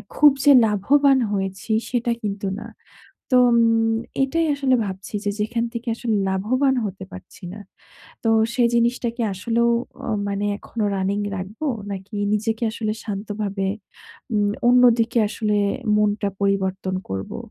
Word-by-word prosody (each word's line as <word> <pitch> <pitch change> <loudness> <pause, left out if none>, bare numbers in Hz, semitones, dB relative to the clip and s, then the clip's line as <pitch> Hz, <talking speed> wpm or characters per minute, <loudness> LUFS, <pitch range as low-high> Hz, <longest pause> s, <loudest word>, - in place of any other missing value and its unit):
খুব 295 -1 +7
যে 290 - +7
লাভবান 265 +7 +3
হয়েছি, 195 +1 -3 0.2
সেটা 240 -1 0
কিন্তু 200 -1 -3
না। - - -8 0.7
তো - - +7
অম 235 - +4 0.7
এটাই 330 +5 0
আসলে 270 -2 +2
ভাবছি 190 +2 -6
যে - - +1
যেখান 230 +2 -1
থেকে 235 +1 -6
আসলে 230 -2 -1
লাভবান 255 +8 +1
হতে 195 -1 -6
পারছি 185 +1 -12
না। 210 - -9 0.6
তো 225 - +2 0.3
সেই 245 -2 +4
জিনিসটা 235 +1 +1
কি 240 - -4
আসলেও 235 +5 +1 0.4
আ - - -2 0.2
মানে 200 0 -2
এখনো 220 0 -4
running 195 +2 -1
রাখবো? 195 +10 -6 0.3
নাকি 195 +2 -7 0.2
নিজেকে 225 +2 -1
আসলে 220 -1 -2
শান্তভাবে 205 -1 -3 0.7
উম 205 -1 +2 0.2
অন্যদিকে 240 -1 +4
আসলে 210 0 -1 0.4
মনটা 210 -1 +1
পরিবর্তন 190 -1 0
করবো? 95 0 -5
215 Hz, 135 wpm, -22 LUFS, 200-235 Hz, 0.7 s, খুব